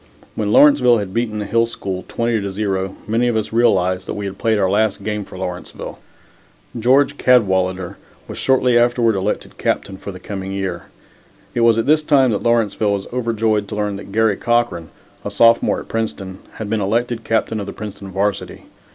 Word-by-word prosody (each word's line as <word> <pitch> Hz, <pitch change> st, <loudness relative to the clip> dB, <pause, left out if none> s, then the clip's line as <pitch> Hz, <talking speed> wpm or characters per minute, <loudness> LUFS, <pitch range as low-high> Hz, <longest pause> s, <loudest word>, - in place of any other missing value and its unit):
When 105 Hz, -1 st, -2 dB
Lawrenceville 125 Hz, -3 st, +6 dB
had 100 Hz, -3 st, -4 dB
beaten 115 Hz, -2 st, -1 dB
the 105 Hz, -, -3 dB
Hill 115 Hz, +2 st, +2 dB
School 95 Hz, -5 st, -5 dB
20 115 Hz, -2 st, -1 dB
to 100 Hz, 0 st, -4 dB
0, 95 Hz, -1 st, -2 dB
many 115 Hz, +3 st, +1 dB
of 120 Hz, -, 0 dB
us 110 Hz, 0 st, -3 dB
realized 95 Hz, -5 st, +2 dB
that -, -, -4 dB
we 105 Hz, -, -4 dB
had 100 Hz, 0 st, -6 dB
played 110 Hz, -1 st, +1 dB
our 95 Hz, -2 st, +2 dB
last 105 Hz, +1 st, 0 dB
game 105 Hz, -1 st, -2 dB
for 95 Hz, -, -12 dB
Lawrenceville. 90 Hz, -1 st, -6 dB, 0.8 s
George 140 Hz, +4 st, +3 dB
Cadwalader 95 Hz, -7 st, +2 dB, 0.3 s
was -, -, -7 dB
shortly 125 Hz, -2 st, +3 dB
afterward 120 Hz, -1 st, +2 dB
elected 100 Hz, +1 st, -3 dB
Captain 95 Hz, -1 st, -1 dB
for 100 Hz, -, -7 dB
the 95 Hz, -, -10 dB
coming 95 Hz, 0 st, -6 dB
year. 95 Hz, -3 st, -4 dB, 0.7 s
It 120 Hz, -, 0 dB
was 115 Hz, -1 st, +5 dB
at 115 Hz, -, +1 dB
this 155 Hz, +2 st, +4 dB
time 140 Hz, -5 st, +3 dB
that 105 Hz, -, -1 dB
Lawrenceville 110 Hz, -3 st, +1 dB
was 100 Hz, -1 st, -3 dB
overjoyed 115 Hz, -4 st, 0 dB
to -, -, -6 dB
learn 105 Hz, -1 st, -2 dB
that 100 Hz, -, -10 dB
Garry 110 Hz, -1 st, +2 dB
Cochran, 120 Hz, -9 st, 0 dB, 0.3 s
a -, -, -3 dB
sophomore 115 Hz, +3 st, +3 dB
at -, -, -13 dB
Princeton, 100 Hz, -4 st, -4 dB
had 110 Hz, -, -6 dB
been 110 Hz, 0 st, -1 dB
elected 115 Hz, +3 st, -1 dB
captain 110 Hz, -1 st, 0 dB
of 100 Hz, -, -5 dB
the -, -, -4 dB
Princeton 100 Hz, -2 st, -8 dB
varsity. 100 Hz, +1 st, -3 dB
105 Hz, 190 wpm, -19 LUFS, 95-115 Hz, 0.8 s, Lawrenceville